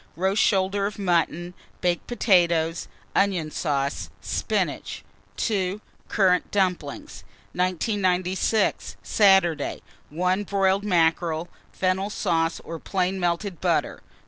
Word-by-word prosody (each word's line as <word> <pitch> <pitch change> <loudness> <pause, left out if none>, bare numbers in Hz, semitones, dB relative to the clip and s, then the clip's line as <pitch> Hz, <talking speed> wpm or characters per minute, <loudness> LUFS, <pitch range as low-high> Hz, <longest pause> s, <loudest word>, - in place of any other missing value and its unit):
Roast 190 +5 +1
shoulder 195 0 +2
of 210 - -7
mutton, 175 -2 0 0.3
baked 175 -2 -1
potatoes, 170 -8 +2 0.3
onion 185 -6 +1
sauce, 140 -3 -2
spinach. - - -2 0.3
2. 195 -2 -1 0.3
Currant 185 -4 +2
dumplings. 180 -7 -2 0.3
1996. 185 +2 0
Saturday. 190 -7 +3 0.3
1. 180 +5 0
Broiled 195 0 +1
mackerel, 170 -3 +1 0.2
fennel 190 +2 0
sauce 165 -5 0
or 165 0 -7
plain 190 +1 -1
melted 175 0 -2
butter. - - 0
185 Hz, 95 wpm, -25 LUFS, 170-195 Hz, 0.3 s, Saturday